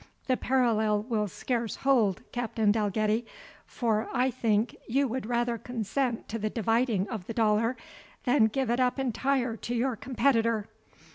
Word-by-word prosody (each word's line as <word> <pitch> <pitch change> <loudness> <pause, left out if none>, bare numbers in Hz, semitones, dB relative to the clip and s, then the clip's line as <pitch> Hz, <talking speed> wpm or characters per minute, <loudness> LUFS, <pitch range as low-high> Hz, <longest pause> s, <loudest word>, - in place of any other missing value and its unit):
"The 255 - +2
parallel 220 -6 +1
will 215 -3 -1
scarce 235 +3 -2
hold, 235 -9 +2
Captain 225 -3 +1
Dalgetty, 215 +1 +1 0.4
for 220 -3 -1
I 255 +2 +1
think 225 -2 0
you 275 +4 +2
would 245 -1 -4
rather 240 -1 0
consent 240 +2 -2
to 230 - -3
the 215 0 -1
dividing 225 -2 +1
of 215 -7 -5
the 230 - -5
dollar, 225 +2 +2 0.5
than 245 -3 +4
give 245 +2 -1
it 240 - +1
up 250 +1 +2
entire 265 -1 0
to 240 - -4
your 250 +1 0
competitor. 230 -3 +1
230 Hz, 150 wpm, -28 LUFS, 215-250 Hz, 0.5 s, than